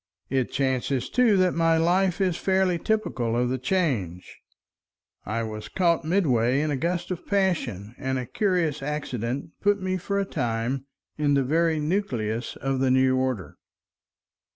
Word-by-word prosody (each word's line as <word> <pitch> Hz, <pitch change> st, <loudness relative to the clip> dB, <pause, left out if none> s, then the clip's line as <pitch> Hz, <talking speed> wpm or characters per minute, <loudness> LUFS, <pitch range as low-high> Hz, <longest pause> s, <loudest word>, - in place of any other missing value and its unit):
It 130 Hz, -2 st, 0 dB
chances 130 Hz, -1 st, -1 dB
too 240 Hz, -5 st, +4 dB
that 185 Hz, -1 st, +3 dB
my 165 Hz, -1 st, +3 dB
case 180 Hz, +3 st, +2 dB
is 185 Hz, -3 st, +2 dB
fairly 190 Hz, -1 st, +1 dB
typical 130 Hz, -, -1 dB
of 125 Hz, 0 st, +1 dB
the 130 Hz, 0 st, -1 dB
Change; 125 Hz, -, -1 dB, 0.9 s
I 115 Hz, +3 st, -1 dB
was 110 Hz, -1 st, -6 dB
caught 170 Hz, -3 st, +2 dB
midway 135 Hz, -, +2 dB
in 155 Hz, 0 st, 0 dB
a -, -, +1 dB
gust 175 Hz, +5 st, -2 dB
of 180 Hz, -, -5 dB
passion; 135 Hz, -, 0 dB
and 130 Hz, -1 st, -1 dB
a 125 Hz, -, -3 dB
curious 170 Hz, -, 0 dB
accident 135 Hz, -2 st, -3 dB
put 205 Hz, 0 st, +3 dB
me 185 Hz, 0 st, -1 dB
for 200 Hz, +2 st, -2 dB
a 200 Hz, -, 0 dB
time 125 Hz, -2 st, -2 dB, 0.3 s
in 145 Hz, -1 st, +3 dB
the 135 Hz, -, +3 dB
very 160 Hz, +3 st, +2 dB
nucleus 125 Hz, -, -2 dB
of 135 Hz, -1 st, -2 dB
the 130 Hz, 0 st, +2 dB
new 130 Hz, 0 st, +4 dB
order. 130 Hz, -7 st, -2 dB
145 Hz, 155 wpm, -25 LUFS, 125-180 Hz, 0.9 s, too